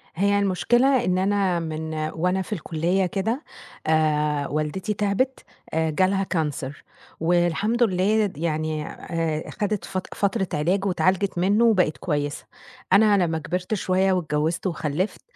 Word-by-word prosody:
هي 200 +3 +2
المشكلة 240 +7 +2
إن 185 0 +1
أنا 190 -2 +1
من 160 -1 -4 0.2
وأنا 180 +3 0
في 200 - -5
الكُلّية 175 +2 0
كده، 220 - -2 0.4
آآ 150 -2 +2
والدتي 155 +7 -2
تعِبِت 210 +6 0 0.3
آآ، 160 0 +1
جالها 190 +5 +2
كانسر 150 -6 -3 0.4
والحمد 175 +8 +2
لله 205 0 +2
يعني 155 -1 -2
آآ 165 -2 -3
خَدِت 210 -1 -2
فت 185 -1 -4
فترة 200 -1 0
علاج 180 +7 +1
واتعالجت 190 0 +1
منّه 200 +6 +3
وبقت 185 -9 +3
كويسة. 145 -3 -2 0.5
أنا 205 -1 +5
لمّا 160 -1 -1
كبرت 180 +6 -3
شوية 190 -1 +2
واتجوِّزت 160 +1 -1
وخلِّفت، 165 +3 -2
180 Hz, 130 wpm, -24 LUFS, 160-200 Hz, 0.5 s, أنا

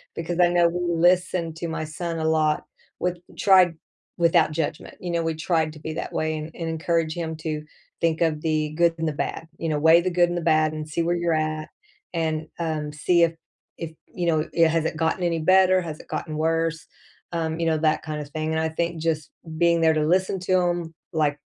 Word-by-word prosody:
because 175 +1 -3
I 175 -1 +6
know 175 -1 +4
we 175 +1 -3 0.2
listen 175 -1 +2
to 170 +1 -4
my 160 -1 -3
son 165 +1 -4
a 160 - -1
lot, 155 -1 +2 0.3
with 180 0 -1 0.2
tried 185 -4 +5 0.4
without 170 -2 +4
judgment, 155 -1 -3
you 175 -1 -4
know, 170 -1 0
we 165 0 0
try 160 0 +1
to 155 0 -10
be 155 +1 -5
that - - -5
way 155 0 -1
and 155 +1 -6
and 165 -1 -4
encourage 160 0 0
him 160 -2 -4
to 155 -1 -4 0.4
think 165 0 +1
of 155 -2 +1
the 155 -1 0
good 170 -1 +4
and 165 - 0
the 155 - -1
bad, 165 +2 -4
you 165 - -3
know, 150 -1 0
"weigh 160 +2 +6
the 185 - 0
good 175 0 +3
and 175 - -2
the - - -2
bad 155 -1 +3
and 155 0 -5
see 170 +2 -1
where 175 +1 +1
you're 170 -1 0
at 155 0 -1 0.4
and, 160 -1 -1
um, 155 -3 -2
see 170 +3 +3
if 165 0 +3 0.4
if, 165 -1 -5 0.2
you 175 -1 -2
know, 155 -2 +1
it 165 -1 +5
has 160 0 +1
it 160 - -1
gotten 160 +3 0
any 170 -1 +1
better? 185 +2 +5
Has 155 -3 -6
it - - -14
gotten 155 -2 -4
worse?" 165 +1 0 0.5
Um, 160 -1 -2
you 165 - 0
know, 160 -1 +2
that 155 -1 +1
kind 155 -1 -4
of 145 - -9
thing 155 +1 -3
and 160 - 0
I 160 - 0
think 170 0 -2
just 155 -2 -1 0.3
being 170 -1 +3
there 160 -1 +5
to 155 -1 +1
listen 190 +2 +2
to 185 0 +2
him 175 -2 -1 0.2
like 150 -2 +1
165 Hz, 230 wpm, -24 LUFS, 155-170 Hz, 0.5 s, I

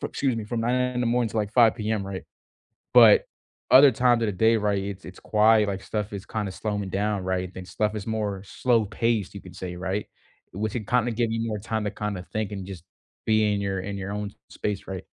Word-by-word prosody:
fr - - -2
excuse 135 -4 -1
me 110 - -4
from 115 +1 -3
9:00 120 +2 +1 0.2
in 125 - -1
the 120 - +1
morning 120 -1 +1
to - - -6
like 105 -1 -1
5:00 115 -3 +5
PM, 105 -3 -2
right? 95 -1 -5 0.7
But - - +8 0.5
other 135 +1 +9
times 120 -2 +3
of - - +1
the - - 0
day, 110 +4 +3
right, 105 -2 0
it's 100 -1 -6
it's 90 - -10
quiet, 110 0 +4
like, 95 0 -4
stuff 105 -1 -3
is 100 0 -6
kinda 105 -4 -3
slowing 105 -1 -3
down, 100 0 -1
right? 95 0 -1
I - - -18
think 95 -1 -9
stuff 105 +3 -1
is 100 - -5
more 105 -3 -2
slow-paced, 115 -2 0
you 100 - -7
could 90 -1 -13
say, 90 -1 -6
right? 95 +3 -3 0.5
Which 110 +3 -3
it 110 -4 -4
kinda 125 -1 +2
give 115 0 0
you 115 0 -1
more 105 -2 -3
time 110 0 -3
to 105 - -1
kinda 105 -3 -4
think 105 -1 -2
and 95 -2 -5
just 95 -4 -9 0.4
be 110 -1 +3
in 100 - -1
your 95 -1 -2
in 100 +1 -5
your 100 0 -5
own 105 -1 -4 0.2
space, 105 -2 -4
right? 95 -2 -5
105 Hz, 235 wpm, -25 LUFS, 95-115 Hz, 0.7 s, other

